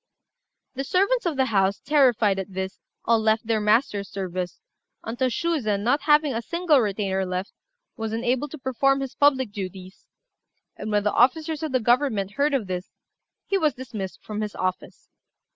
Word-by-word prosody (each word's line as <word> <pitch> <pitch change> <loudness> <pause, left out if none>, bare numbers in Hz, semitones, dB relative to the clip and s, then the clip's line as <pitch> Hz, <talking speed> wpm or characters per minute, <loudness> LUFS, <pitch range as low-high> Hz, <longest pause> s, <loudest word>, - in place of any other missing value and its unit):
The 270 - -3
servants 395 - +1
of 325 - -1
the 265 - +3
house, 195 -4 +1
terrified 240 -9 +3
at 190 0 -7
this, 190 0 -4 0.3
all 230 0 +4
left 220 +1 +1
their 220 -1 +1
master's 210 -2 +1
service, 185 -2 -4 0.4
until 245 +3 -1
Shuzen, 235 -8 -1
not 250 +6 +2
having 295 -1 +3
a 230 - -2
single 335 +2 +2
retainer 195 -3 0
left, 185 +1 -4 0.4
was 225 -1 -3
unable 245 +5 0
to 310 - -9
perform 275 +1 +1
his 270 -2 -4
public 265 -5 +3
duties; 190 -2 -8 0.7
and 215 - -6
when 205 -1 +2
the 210 - +1
officers 310 +5 +2
of 315 -2 -3
the 255 - +2
government 240 -4 +1
heard 285 +5 +1
of 245 -6 -1
this, 180 -1 -5 0.6
he 390 - 0
was 305 -7 +1
dismissed 220 -7 -7
from 215 0 -4
his 210 -1 -4
office. 185 0 -4
230 Hz, 170 wpm, -24 LUFS, 200-275 Hz, 0.7 s, all